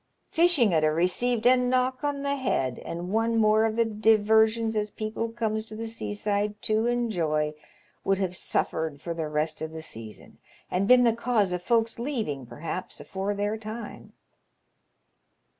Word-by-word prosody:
Fishing 325 Hz, -, +4 dB
'ud 160 Hz, -, +3 dB
ha' -, -, +5 dB
received 185 Hz, +9 st, +1 dB
a 255 Hz, +1 st, +7 dB
knock 255 Hz, +1 st, +1 dB
on 285 Hz, -1 st, -1 dB
the 280 Hz, 0 st, 0 dB
head, 130 Hz, -, -1 dB
and 175 Hz, +2 st, -6 dB
one 225 Hz, +1 st, +2 dB
more 215 Hz, 0 st, +4 dB
of 220 Hz, -1 st, -1 dB
the 230 Hz, 0 st, +3 dB
deversions 220 Hz, +1 st, +3 dB
as 210 Hz, 0 st, 0 dB
people 220 Hz, +2 st, -4 dB
comes 220 Hz, -2 st, -2 dB
to 215 Hz, -, -7 dB
the 225 Hz, +1 st, -5 dB
seaside 205 Hz, -2 st, -2 dB
to 220 Hz, +2 st, +1 dB
enjoy 170 Hz, -11 st, 0 dB, 0.5 s
would 195 Hz, 0 st, +2 dB
have 185 Hz, -2 st, -2 dB
suffered 160 Hz, -3 st, -1 dB
for 170 Hz, +3 st, -4 dB
the 165 Hz, -2 st, -3 dB
rest 155 Hz, +1 st, -1 dB
of 160 Hz, 0 st, -5 dB
the 160 Hz, 0 st, -7 dB
season, 110 Hz, -7 st, -9 dB, 0.3 s
and 190 Hz, +2 st, +1 dB
been 250 Hz, +1 st, +7 dB
the 230 Hz, -2 st, +4 dB
cause 230 Hz, -4 st, +1 dB
of 180 Hz, -1 st, -2 dB
folks 230 Hz, +2 st, +1 dB
leaving, 220 Hz, -, -3 dB
perhaps, 165 Hz, +7 st, -6 dB
afore 195 Hz, +1 st, -3 dB
their 205 Hz, +2 st, -1 dB
time." 220 Hz, 0 st, -8 dB
215 Hz, 165 wpm, -27 LUFS, 180-230 Hz, 0.5 s, a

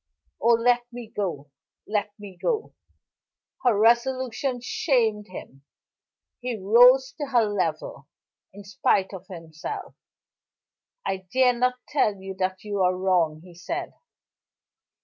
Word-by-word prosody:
Oh, 235 Hz, -, +5 dB
let 240 Hz, +1 st, +1 dB
me 240 Hz, -2 st, -9 dB
go! 150 Hz, -8 st, -3 dB, 0.4 s
Let 210 Hz, -1 st, -1 dB
me 205 Hz, -3 st, -11 dB
go!" 440 Hz, -, -2 dB, 0.9 s
Her 240 Hz, -5 st, +3 dB
resolution 245 Hz, +3 st, +1 dB
shamed 230 Hz, -5 st, 0 dB
him. 135 Hz, -7 st, -10 dB, 0.8 s
He 245 Hz, -2 st, -3 dB
rose 245 Hz, +6 st, +6 dB
to 290 Hz, -, -3 dB
her 245 Hz, -4 st, +3 dB
level, 165 Hz, -8 st, -3 dB, 0.4 s
in 205 Hz, +1 st, -12 dB
spite 195 Hz, -1 st, 0 dB
of 190 Hz, 0 st, -9 dB
himself. 165 Hz, -3 st, -7 dB, 1.1 s
"I 190 Hz, -1 st, -3 dB
dare 255 Hz, -1 st, +4 dB
not 250 Hz, +1 st, +1 dB
tell 220 Hz, -8 st, +1 dB
you 190 Hz, 0 st, -8 dB
that 185 Hz, 0 st, -2 dB
you 205 Hz, -2 st, -2 dB
are 180 Hz, 0 st, +2 dB
wrong," 175 Hz, -5 st, +1 dB
he 180 Hz, -1 st, -14 dB
said. 335 Hz, -, -5 dB
210 Hz, 125 wpm, -25 LUFS, 185-245 Hz, 1.1 s, rose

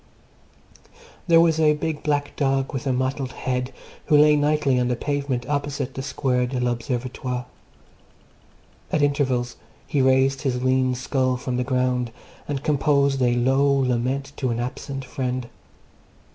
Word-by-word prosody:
There 165 Hz, -1 st, +6 dB
was 165 Hz, -1 st, +3 dB
a 150 Hz, -1 st, +4 dB
big 155 Hz, 0 st, -3 dB
black 145 Hz, -1 st, -1 dB
dog 135 Hz, -1 st, 0 dB
with 135 Hz, 0 st, -4 dB
a -, -, +2 dB
mottled 130 Hz, +1 st, -1 dB
head 125 Hz, 0 st, -2 dB, 0.3 s
who 150 Hz, -, +4 dB
lay 150 Hz, 0 st, +6 dB
nightly 145 Hz, -3 st, +2 dB
on 125 Hz, -, +1 dB
the 125 Hz, -, 0 dB
pavement 140 Hz, -2 st, -2 dB
opposite 140 Hz, -2 st, -2 dB
the 135 Hz, -, -5 dB
Square 130 Hz, -2 st, 0 dB
de 125 Hz, 0 st, -3 dB
l'Observatoire. 125 Hz, +1 st, -2 dB, 1.5 s
At 155 Hz, -, +2 dB
intervals 130 Hz, -4 st, 0 dB, 0.3 s
he 140 Hz, -, 0 dB
raised 130 Hz, +1 st, +3 dB
his 125 Hz, -3 st, -1 dB
lean 130 Hz, 0 st, +2 dB
skull 130 Hz, 0 st, 0 dB
from 125 Hz, 0 st, -3 dB
the 125 Hz, -, 0 dB
ground 125 Hz, -2 st, 0 dB, 0.4 s
and 145 Hz, -2 st, -3 dB
composed 140 Hz, -2 st, +2 dB
a 120 Hz, -1 st, +3 dB
low 130 Hz, +3 st, +2 dB
lament 135 Hz, +1 st, 0 dB
to 130 Hz, -, -1 dB
an 120 Hz, 0 st, -1 dB
absent 130 Hz, +2 st, -5 dB
friend. 125 Hz, -1 st, -3 dB
130 Hz, 145 wpm, -23 LUFS, 125-140 Hz, 1.5 s, There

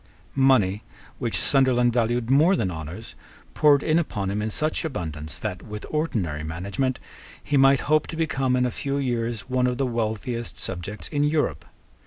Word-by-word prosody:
Money, 120 Hz, -8 st, +3 dB, 0.4 s
which -, -, 0 dB
Sunderland 125 Hz, -3 st, +3 dB
valued 120 Hz, 0 st, +1 dB
more 160 Hz, +8 st, +5 dB
than 95 Hz, -, -1 dB
honours, 80 Hz, 0 st, -7 dB, 0.4 s
poured 145 Hz, -2 st, +4 dB
in 160 Hz, +1 st, +3 dB
upon 100 Hz, -, -2 dB
him 105 Hz, +1 st, -1 dB
in 110 Hz, -, -1 dB
such 155 Hz, +10 st, -1 dB
abundance 80 Hz, -, -5 dB
that, 100 Hz, -4 st, -4 dB
with 105 Hz, -1 st, -8 dB
ordinary 100 Hz, -, -1 dB
management, 100 Hz, -, -2 dB, 0.5 s
he 145 Hz, -, -1 dB
might 135 Hz, 0 st, +5 dB
hope 155 Hz, +1 st, +2 dB
to -, -, -6 dB
become, 135 Hz, -5 st, 0 dB
in 125 Hz, 0 st, +2 dB
a 125 Hz, -, 0 dB
few 140 Hz, +3 st, -2 dB
years, 120 Hz, -4 st, -1 dB
one 125 Hz, +4 st, 0 dB
of 125 Hz, -1 st, -1 dB
the 135 Hz, -, +1 dB
wealthiest 115 Hz, 0 st, -3 dB
subjects 95 Hz, +3 st, -4 dB
in 145 Hz, -2 st, 0 dB
Europe. 145 Hz, -, 0 dB
125 Hz, 170 wpm, -24 LUFS, 100-140 Hz, 0.5 s, more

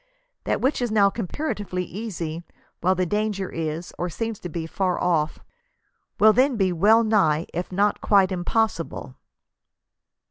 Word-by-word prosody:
That -, -, 0 dB
which 265 Hz, 0 st, +1 dB
is 245 Hz, -, 0 dB
now 200 Hz, -2 st, +4 dB
comparatively 205 Hz, -, -3 dB
easy, 175 Hz, -4 st, -5 dB, 0.4 s
while 185 Hz, +2 st, +2 dB
the 185 Hz, 0 st, 0 dB
danger 205 Hz, 0 st, -2 dB
is, 165 Hz, +1 st, -4 dB
or 180 Hz, -, -1 dB
seems 225 Hz, +4 st, -4 dB
to 175 Hz, -, -7 dB
be, 165 Hz, 0 st, -4 dB
far 180 Hz, +2 st, -1 dB
off, 160 Hz, -3 st, +1 dB, 0.8 s
will 215 Hz, +1 st, +7 dB
then 255 Hz, +1 st, +3 dB
be 190 Hz, -3 st, +2 dB
well 215 Hz, +7 st, +5 dB
nigh, 185 Hz, -8 st, +2 dB
if 175 Hz, +2 st, -4 dB
not 200 Hz, +3 st, +1 dB
quite, 195 Hz, -3 st, +4 dB
impos 185 Hz, +1 st, 0 dB
sible." 140 Hz, -4 st, -9 dB
190 Hz, 150 wpm, -24 LUFS, 170-215 Hz, 0.8 s, will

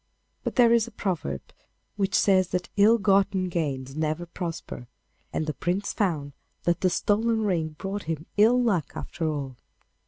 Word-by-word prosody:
But -, -, -3 dB
there 235 Hz, -2 st, +6 dB
is 235 Hz, -1 st, +3 dB
a -, -, -10 dB
proverb 155 Hz, -, -3 dB, 0.5 s
which 195 Hz, -2 st, 0 dB
says 185 Hz, -2 st, +4 dB
that 180 Hz, 0 st, -3 dB
ill 215 Hz, +3 st, +6 dB
gotten 195 Hz, -2 st, +2 dB
gains 135 Hz, -6 st, -3 dB
never 155 Hz, +2 st, -1 dB
prosper, 165 Hz, -, -6 dB, 0.4 s
and 155 Hz, -, -1 dB
the 155 Hz, -, -2 dB
Prince 185 Hz, +6 st, -2 dB
found 155 Hz, -9 st, -1 dB, 0.3 s
that 175 Hz, 0 st, +1 dB
the 185 Hz, -, +4 dB
stolen 220 Hz, +5 st, +1 dB
ring 165 Hz, -6 st, -1 dB
brought 195 Hz, +3 st, -4 dB
him 160 Hz, -1 st, -3 dB
ill 225 Hz, +4 st, +5 dB
luck 205 Hz, -, +1 dB
after 165 Hz, -2 st, -3 dB
all. 140 Hz, -4 st, -4 dB
180 Hz, 160 wpm, -26 LUFS, 155-205 Hz, 0.5 s, there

